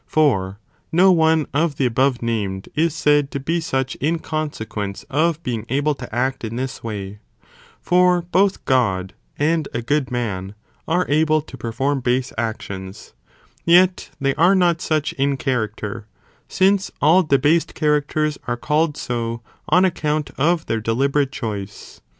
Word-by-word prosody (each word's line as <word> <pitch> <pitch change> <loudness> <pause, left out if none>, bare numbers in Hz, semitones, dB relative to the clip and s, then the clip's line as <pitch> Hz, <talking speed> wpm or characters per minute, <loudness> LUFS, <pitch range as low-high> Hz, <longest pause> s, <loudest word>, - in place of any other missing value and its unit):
For 100 -11 +1 0.3
no 185 +3 +5
one 160 -3 +3
of 155 +1 +1
the 135 - 0
above 125 +1 +1
named 100 -5 -2
is 160 0 +1
said 145 -3 +2
to 140 - -4
be 165 +5 -1
such 135 -3 -1
in 160 +4 0
consequence 110 -11 -4
of 165 +3 +1
being 115 -4 -3
able 145 +4 +1
to 125 -4 -9
act 130 +1 -1
in 115 0 -4
this 130 +1 -4
way, 105 -2 -6 0.6
for 180 0 +3
both 190 +3 +1
God 95 -8 +1 0.2
and 155 +1 +1
a 120 - -2
good 140 +1 0
man 105 -5 -3 0.3
are 175 +2 +1
able 155 +1 +3
to 145 - -11
perform 130 +4 -1
base 125 0 -1
actions, 100 -3 -5 0.5
yet 180 +2 +4
they 135 0 +1
are 170 +6 +4
not 175 -3 +2
such 155 -2 0
in 140 0 0
character, 110 -5 -3 0.4
since 195 +1 +2
all 160 +6 +5
de 150 -5 +2
hased 155 +5 +1
characters 150 0 0
are 120 0 -1
called 150 +3 0
so, 115 -1 -3 0.3
on 180 +1 +5
account 155 -4 -1
of 165 +3 +1
their 115 -1 -1
deliberate 135 +5 +1
choice.'! 105 -6 -6
140 Hz, 150 wpm, -21 LUFS, 115-160 Hz, 0.6 s, no